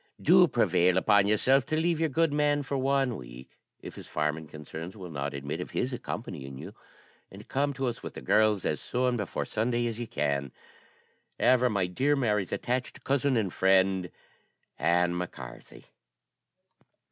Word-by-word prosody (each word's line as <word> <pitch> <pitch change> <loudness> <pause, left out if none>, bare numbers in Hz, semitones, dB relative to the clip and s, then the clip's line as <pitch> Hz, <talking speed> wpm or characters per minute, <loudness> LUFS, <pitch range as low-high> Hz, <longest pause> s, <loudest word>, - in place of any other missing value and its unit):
Do 180 +2 +6
prevail 90 - +2
upon 100 +1 +4
yourself 130 +6 +3
to 155 - 0
leave 165 -1 +1
your 160 -1 +1
good 160 +2 +1
man 145 0 +2
for 140 +1 -4
one 135 -2 +1
week, - - -12 0.2
if - - -8
his - - -9
farming 75 +1 -2
concerns 80 +6 -8
will 90 -3 -8
not 70 -1 -4
admit 70 +5 -4
of - - -6
his 125 +1 -1
accompanying 75 - -6
you; - - -9 0.6
and - - -13
come 140 +1 0
to 135 0 -3
us, 120 -2 -3
with - - -8
the - - -7
girls, 105 +6 +2
as - - -1
soon 125 0 0
before 105 -6 -3
Sunday 120 +2 -1
as 115 -1 -3
you 120 - -4
can. 70 - -1 0.9
"Ever 125 0 +4
my 100 -4 0
dear 130 +12 +1
Mary's 105 -8 0
attached 125 +1 -3
cousin 140 -1 +1
and 100 -5 -1
friend, 95 -1 +3 0.7
"ANN 90 0 +2
MAC 90 0 -4
CARTHY." - - -11
105 Hz, 170 wpm, -28 LUFS, 85-130 Hz, 0.9 s, Do